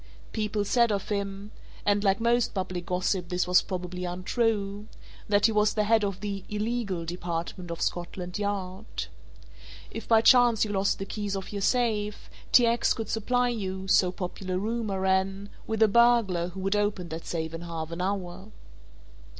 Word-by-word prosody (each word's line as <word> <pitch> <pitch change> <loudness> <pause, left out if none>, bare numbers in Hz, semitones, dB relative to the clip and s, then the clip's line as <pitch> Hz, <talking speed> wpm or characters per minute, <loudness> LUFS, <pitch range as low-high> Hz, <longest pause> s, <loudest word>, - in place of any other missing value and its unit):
People 210 -1 -1
said 235 +1 +3
of 200 -2 -2
him 200 0 -3 0.3
and 205 0 +2
like 195 0 +3
most 235 0 +2
public 185 -2 -3
gossip, 180 0 0
this 180 0 0
was 180 0 +5
probably 180 -1 -5
untrue 200 +3 -1 0.4
that 205 0 +4
he 225 - +5
was 210 0 +2
the 215 - +2
head 220 0 +3
of 195 -2 -2
the 200 -2 -4
"illegal" 210 -4 -2
department 175 +1 -4
of 170 0 -3
Scotland 175 +1 -3
Yard. 200 0 -3 0.9
If 225 - -7
by 225 -1 +5
chance 240 -3 +6
you 210 - -4
lost 195 0 +1
the 195 - -4
keys 205 0 -3
of 190 -1 -5
your 200 -1 -4
safe, 210 -2 0 0.2
T. 245 - +7
X. 235 0 +2
could 225 - -5
supply 245 +3 +1
you 190 -5 -4
(so 185 -1 +4
popular 185 0 -4
rumour 215 -1 -2
ran) 190 +1 0 0.2
with 220 0 +2
a - - +6
burglar 220 -6 +4
who 185 +2 -7
would 195 +2 0
open 205 -4 -1
that 160 +1 -6
safe 160 -1 -3
in 165 - -5
half 165 -2 -5
an 170 +2 -4
hour. 190 +1 -3
200 Hz, 175 wpm, -27 LUFS, 180-215 Hz, 0.9 s, T